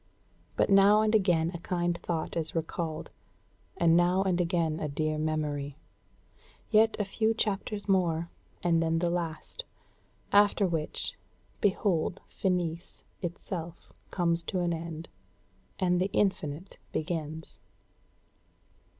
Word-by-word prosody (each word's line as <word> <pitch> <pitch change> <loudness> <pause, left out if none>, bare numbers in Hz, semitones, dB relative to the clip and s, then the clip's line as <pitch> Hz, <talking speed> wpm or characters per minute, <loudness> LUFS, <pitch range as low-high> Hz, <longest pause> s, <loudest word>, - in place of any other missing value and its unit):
But - - +2
now 200 +2 +7
and 215 0 +2
again 175 -6 +3
a 170 - -5
kind 175 0 -1
thought 170 -2 -3
is 165 -1 0
recalled, 160 -1 -3 0.7
and 165 -1 +4
now 175 +2 +4
and 180 -2 +1
again 170 -2 0
a 150 - -2
dear 155 +2 -1
memory. 150 -2 -2 0.9
Yet 220 +1 +5
a 210 - 0
few 220 +3 +1
chapters 210 -1 -1
more, 170 -4 +1 0.3
and 170 -2 +3
then 165 0 +1
the 170 +1 +1
last; 170 - -4 0.7
after 205 0 +5
which, 165 -4 -2 0.4
behold 190 -4 +1
Finis 175 -2 -2 0.2
itself 170 -1 -6 0.2
comes 170 -2 0
to 185 +1 -1
an 175 -1 +1
end, 165 0 -5 0.7
and 180 -2 +2
the 190 - +1
Infinite 185 -3 -1
begins." 160 -1 -4
170 Hz, 120 wpm, -29 LUFS, 160-190 Hz, 0.9 s, now